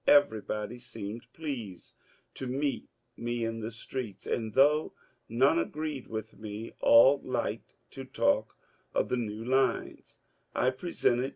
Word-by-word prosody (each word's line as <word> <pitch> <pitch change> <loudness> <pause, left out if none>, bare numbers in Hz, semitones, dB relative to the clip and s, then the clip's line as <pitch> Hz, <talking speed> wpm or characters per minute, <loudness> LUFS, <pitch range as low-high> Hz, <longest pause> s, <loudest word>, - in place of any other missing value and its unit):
Everybody 110 -4 +3
seemed 115 0 -7
pleased 120 - -6 0.4
to 130 - -5
meet 140 +3 -1 0.3
me 120 0 -2
in 115 0 -3
the 110 0 -3
streets, 115 -1 -6
and 110 -3 -2
though 150 +3 +4 0.4
none 135 +8 +4
agreed 150 -5 -3
with 110 -2 -6
me 110 +1 -6
all 135 +5 +7
liked 125 -2 -3 0.2
to - - -7
talk - - +1 0.4
of - - +1
the 125 - +1
new 110 -1 -3
lines 130 +1 0 0.4
I 130 - +3
presented. 130 -4 0
120 Hz, 130 wpm, -30 LUFS, 110-135 Hz, 0.4 s, all